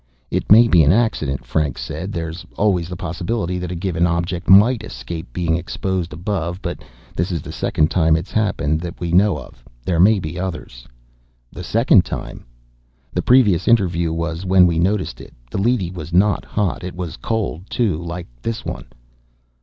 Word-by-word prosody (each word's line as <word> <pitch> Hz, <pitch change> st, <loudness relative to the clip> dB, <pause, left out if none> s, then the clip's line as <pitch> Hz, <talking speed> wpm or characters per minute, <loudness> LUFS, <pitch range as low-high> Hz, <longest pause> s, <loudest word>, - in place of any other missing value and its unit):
"It -, -, -2 dB
may 115 Hz, +3 st, +8 dB
be 90 Hz, -7 st, +5 dB
an 75 Hz, 0 st, +5 dB
accident," 75 Hz, -, 0 dB
Franks 70 Hz, +1 st, -1 dB
said. 80 Hz, +9 st, -5 dB
"There's 85 Hz, -1 st, -5 dB
always 90 Hz, -5 st, +1 dB
the 90 Hz, -, -5 dB
possibility 90 Hz, +1 st, -3 dB
that 90 Hz, -1 st, -4 dB
a -, -, -3 dB
given 85 Hz, -1 st, 0 dB
object 85 Hz, +1 st, -2 dB
might 105 Hz, +5 st, +6 dB
escape -, -, -7 dB
being 85 Hz, +2 st, 0 dB
exposed 90 Hz, 0 st, -3 dB
above. 90 Hz, +1 st, -3 dB
But -, -, -5 dB, 0.3 s
this 90 Hz, +3 st, -1 dB
is 85 Hz, -5 st, -3 dB
the -, -, -7 dB
second 75 Hz, 0 st, 0 dB
time 80 Hz, -3 st, +3 dB
it's 85 Hz, +4 st, -4 dB
happened 80 Hz, -8 st, 0 dB
that 85 Hz, -1 st, -7 dB
we 85 Hz, -1 st, -3 dB
know 95 Hz, +2 st, +4 dB
of. -, -, -12 dB, 0.2 s
There 85 Hz, -3 st, 0 dB
may 105 Hz, +4 st, +6 dB
be 80 Hz, 0 st, -5 dB
others." 85 Hz, -10 st, -6 dB, 0.6 s
"The -, -, -8 dB
second -, -, +4 dB
time?" -, -, -7 dB, 0.7 s
"The 90 Hz, -, 0 dB
previous 105 Hz, -7 st, +4 dB
interview 85 Hz, -8 st, +2 dB
was 85 Hz, +1 st, -3 dB
when 95 Hz, -1 st, +5 dB
we 85 Hz, -2 st, +1 dB
noticed 95 Hz, +3 st, -1 dB
it. -, -, -14 dB, 0.2 s
The -, -, -2 dB
leady 105 Hz, -6 st, +1 dB
was 85 Hz, -3 st, -8 dB
not 100 Hz, +4 st, +2 dB
hot. 100 Hz, -4 st, -2 dB
It 90 Hz, -1 st, -6 dB
was 90 Hz, -3 st, -5 dB
cold, 105 Hz, -5 st, -3 dB
too, 110 Hz, -10 st, 0 dB
like 85 Hz, +1 st, -5 dB, 0.2 s
this 115 Hz, -1 st, -4 dB
one." -, -, -5 dB
90 Hz, 180 wpm, -20 LUFS, 80-95 Hz, 0.7 s, may